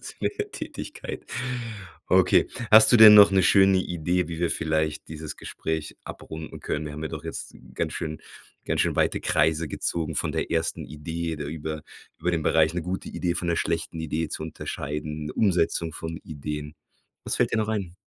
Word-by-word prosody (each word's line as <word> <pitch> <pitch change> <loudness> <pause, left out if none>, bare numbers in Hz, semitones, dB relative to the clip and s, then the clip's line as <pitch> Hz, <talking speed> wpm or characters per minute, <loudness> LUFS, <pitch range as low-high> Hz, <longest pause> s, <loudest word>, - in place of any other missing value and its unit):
zu - - -9
der 415 0 -2
Tätigkeit. - - -7 0.8
Okay. - - +4 0.2
Hast 110 +3 +8
du - - +8
denn 110 -2 +11
noch 105 -1 +9
'ne 95 -1 +4
schöne 95 +1 +5
Idee, 90 0 -1
wie 85 -1 -5
wir 85 - +1
vielleicht 80 -1 -1
dieses 80 -1 -7
Gespräch 80 -1 -4
abrunden 80 -1 -8
können? 75 - -3
Wir 75 - -6
haben 75 +1 -7
ja 80 - -2
doch - - -7
jetzt - - -6 0.2
ganz - - -2
schön 80 -2 -4 0.4
ganz - - 0
schön - - +1
weite - - +2
Kreise 80 -1 +1
gezogen 80 +2 -2
von - - -1
der - - -2
ersten 80 -1 -1
Idee, 80 +4 -4
da 75 - -5
über 75 +1 -5 0.4
über 90 - 0
den 85 -2 0
Bereich 80 +1 +3
'ne 90 - -2
gute 90 +3 -4
Idee 85 -2 -2
von 85 0 -3
'ner 85 - +1
schlechten 80 0 -2
Idee 80 0 -2
zu 80 - -5
unterscheiden, 75 -1 -5
Umsetzung 85 -4 +1
von 80 +1 -6
Ideen. 75 0 -6 0.5
Was - - -1
fällt - - +1
dir 115 - +2
noch 110 0 0
ein? 100 -5 -3
80 Hz, 185 wpm, -26 LUFS, 75-90 Hz, 0.8 s, denn